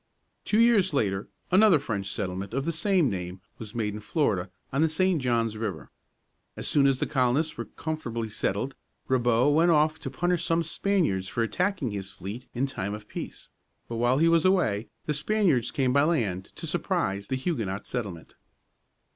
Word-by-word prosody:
Two 215 - +2
years 225 -7 +4
later 100 -6 0 0.2
another 190 -2 +6
French 100 -8 -3
settlement 100 +1 -4
of 135 +1 -1
the 170 - 0
same 170 0 +2
name 90 -3 -4 0.2
was 110 0 -8
made 105 -3 -1
in 105 - -5
Florida, 105 - 0 0.2
on 135 - +2
the 160 - +4
St. 175 0 +1
Johns 115 -3 0
River. 105 -7 -4 0.7
As - - -4
soon 140 -2 +4
as 135 -1 +3
the - - 0
colonists 135 +3 +1
were 115 - -5
comfortably 120 -4 -4
settled, 105 +4 -2 0.3
Ribault 125 +2 +3
went 165 +3 +4
off 155 -1 +3
to 140 - -5
punish 175 +4 0
some 165 0 +1
Spaniards 160 - 0
for 115 +4 -1
attacking 170 - -1
his 100 -1 -4
fleet 105 +7 -8
in 130 +3 +1
time 100 -6 -3
of 105 0 -11
peace. - - -7 0.4
But 115 - -4
while 120 +2 +3
he 165 +3 +4
was 165 -1 +4
away 140 - +2 0.2
the 150 - 0
Spaniards 155 - +1
came 130 -2 +1
by 140 - +5
land 115 - 0
to - - -7
surprise 100 +1 -1
the 130 - -1
Huguenot 115 - -2
settlement. 100 -10 -5
130 Hz, 180 wpm, -27 LUFS, 105-160 Hz, 0.7 s, another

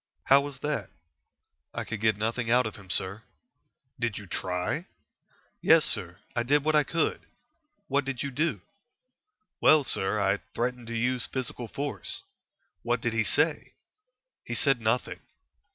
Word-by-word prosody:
"How 135 +1 +6
was 140 -2 -6
that?" 150 -10 -2 0.9
"I - - -2
could 115 -2 -5
get 110 -2 +3
nothing 115 +2 -1
out 125 +1 +4
of 110 - -4
him, 100 -2 -14
sir." 95 +4 -1 0.8
"Did 120 -3 -1
you 105 - -7
try?" 90 - -2 0.7
"Yes, - - +6
sir; 90 +1 -1 0.2
I 120 - +2
did 140 +4 +2
what 155 +1 +2
I 150 -1 +5
could." 165 +3 0 0.7
"What 140 +1 +2
did 135 -1 -3
you 140 - -3
do?" 140 - 0 1.0
"Well, 155 -2 +6
sir, 105 -4 +1
I 100 0 +2 0.2
threatened 125 0 -2
to 115 0 -3
use 125 +1 +1
physical 125 -2 -4
force." 145 - -4 0.6
"What - - 0
did - - -1
he - - +2
say?" - - +1 0.7
"He - - -4
said 135 -4 +3
nothing." 110 +3 0
120 Hz, 150 wpm, -28 LUFS, 105-140 Hz, 1.0 s, How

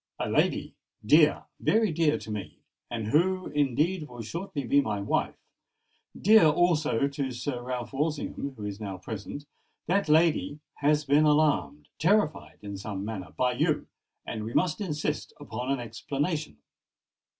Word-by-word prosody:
A - - -2
lady—dear, 150 +8 +2 0.2
very 220 -3 +2
dear 155 -1 +2
to 110 - -8
me, 105 -2 -6 0.3
and 115 -3 -3
who 185 +7 +2
indeed 150 +4 0
will 120 -2 -8
shortly 160 - -4
be 140 +3 +4
my 105 - -2
wife,—dear 180 - 0
also 155 -5 +2
to 140 -1 -3
Sir 125 +1 -4
Ralph 125 0 -5
Walsingham, 145 -1 -2
who 105 - -7
is 100 0 -5
now 100 -3 -5
present,—that 145 - -5
lady 155 -1 +3 0.2
has 150 +1 +2
been 145 +2 +4
alarmed—terrified 150 - +1
in 100 -1 -6
some 100 0 -5
manner, 95 -7 -6
by 125 0 +2
you; 125 - 0 0.4
and 110 - -4
we 115 +2 -6
must 180 +2 +1
insist 150 -7 -2
upon 125 +4 -4
an 140 - 0
explanation." 140 - -3
140 Hz, 135 wpm, -28 LUFS, 115-155 Hz, 0.4 s, be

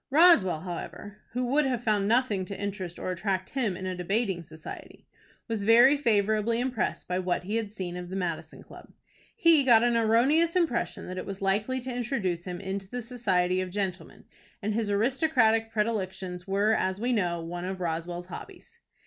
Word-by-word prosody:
Roswell, 275 - +5
however, 195 +3 -7 0.2
who 250 +1 -1
would 280 +5 +2
have 250 -3 -1
found 210 -3 +1
nothing 225 -4 +2
to 195 0 -7
interest 195 -4 -4
or 185 - -3
attract 185 +1 -2
him 230 -9 -1
in 185 - -6
a 185 0 -2
Debating 190 +1 -1
Society, 160 -1 -11 0.4
was 225 -3 -2
very 240 +6 +7
favorably 220 -3 +1
impressed 250 -2 -2
by 180 0 -1
what 180 -1 -1
he 210 +5 -2
had 220 -3 -3
seen 185 -4 -5
of 180 0 -6
the 190 - -5
Madison 175 -4 -4
Club. - - -14 0.4
He 335 -8 +5
got 235 -3 +6
an 240 -1 +2
erroneous 255 +10 +3
impression 330 -10 0
that 185 0 -5
it - - -6
was 195 -1 -5
likely 205 +7 0
to 250 0 -5
introduce 215 -9 -2
him 180 -1 -5
into 195 0 -5
the 245 +1 -5
society 185 -7 0
of 185 - -4
gentlemen, 190 -1 -4 0.4
and 215 0 -2
his 220 -1 -1
aristocratic 225 0 +2
predilections 190 -5 -2
were, 200 +3 +2
as 190 -2 0
we 245 +3 0
know, 175 -6 0
one 175 +2 -5
of 190 0 -4
Roswell's 175 +1 -3
hobbies. 465 - -11
205 Hz, 185 wpm, -28 LUFS, 185-240 Hz, 0.4 s, very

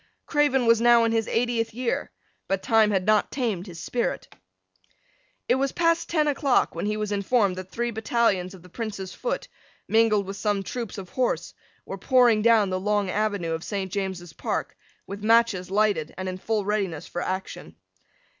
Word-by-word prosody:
Craven 290 -4 +2
was 230 0 +4
now 235 -1 +6
in 230 - +2
his 225 -1 0
eightieth 230 -1 0
year; 250 -1 -2 0.4
but 195 0 -1
time 220 -1 +4
had 190 -3 0
not 215 -1 +3
tamed 220 -8 -2
his 170 -2 -9
spirit. 240 +3 -2 1.2
It - - +4
was 275 -1 0
past 335 0 +1
ten 305 -3 +2
o'clock 280 -2 +2
when 170 +5 -3
he 210 0 -1
was 210 -1 -3
informed 200 -1 +1
that 185 0 -7
three 240 +3 -2
battalions 215 -4 0
of 180 - -15
the 180 - -15
Prince's 205 -2 -5
foot, - - -3 0.4
mingled 220 -2 +3
with 195 +1 -6
some 205 -1 0
troops 235 +2 -5
of 190 -2 -8
horse, 255 -1 -1 0.3
were - - -7
pouring 245 -4 +4
down 220 -3 +4
the 185 - -1
long 205 -1 0
avenue 205 -5 -1
of 160 +1 -3
St. 195 -3 -4
James's 190 -4 -4
Park, - - -3 0.3
with 200 +1 -8
matches 225 -5 +3
lighted, 200 -6 +1
and 185 - -4
in 185 0 -4
full 215 0 -1
readiness 195 -7 -2
for 175 - -5
action. 190 +1 -5
210 Hz, 180 wpm, -25 LUFS, 190-235 Hz, 1.2 s, now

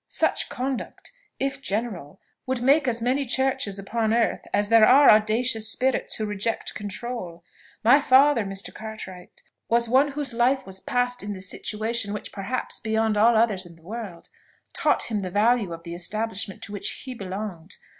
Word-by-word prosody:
Such - - +1
conduct, 260 0 -5 0.3
if 275 0 -2
general, 205 - -4 0.3
would 260 -1 0
make 280 +3 +4
as 235 -2 0
many 260 +4 +1
churches 265 -5 -1
upon 220 +3 -1
earth 235 -1 +1
as 205 0 +1
there 225 -1 +7
are 280 +2 +8
audacious 220 +1 +2
spirits 260 +3 0
who 215 - -3
reject 210 +2 -2
control. 205 -4 -6 0.4
My 245 +6 +7
father, 265 -2 +5
Mr. 195 0 -6
Cartwright, 215 -5 -9 0.3
was 235 0 +3
one 270 +4 +3
whose 280 -4 -2
life 250 +3 +2
was 190 0 -5
passed 245 +3 -1
in 205 0 -5
the 190 - -8
situation 210 +3 -2
which, 210 - -6
perhaps, 210 +6 -3
beyond 220 -1 0
all 225 +2 +5
others 205 -5 +2
in 170 - -15
the 165 - -22
world, 200 -3 -8 0.4
taught - - +2
him 215 -3 -2
the 185 -2 -4
value 210 0 +2
of 165 0 -7
the 170 0 -7
establishment 200 +2 -3
to - - -7
which 205 - -2
he 260 - -5
belonged. 190 -4 -7
220 Hz, 170 wpm, -25 LUFS, 200-245 Hz, 0.4 s, are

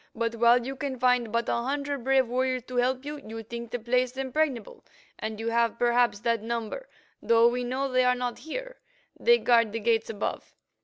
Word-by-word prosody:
But 230 0 -1
while 235 +1 +4
you 270 +1 -4
can 270 -1 -4
find 250 -2 +2
but 235 +1 0
a - - +1
hundred 280 +2 -2
brave 265 -1 +3
warriors 255 +1 -1
to 250 0 -7
help 255 +2 +1
you, 295 +1 -5
you 225 -3 -8
think 235 +1 -7
the 245 - -3
place 250 +2 0
impregnable, 280 - -2 0.4
and 220 0 -5
you 225 +1 -2
have 230 0 +1
perhaps 240 -3 +2
that 230 -2 0
number, 235 - -4 0.3
though 230 0 +5
we 245 +1 0
know 260 +3 -1
they 255 -1 +2
are 250 0 +3
not 245 -1 -3
here; - - -7 0.4
they 475 0 +5
guard 230 - +3
the 230 - -2
gates 225 0 +1
above. 210 -2 -4
245 Hz, 200 wpm, -27 LUFS, 230-260 Hz, 0.4 s, though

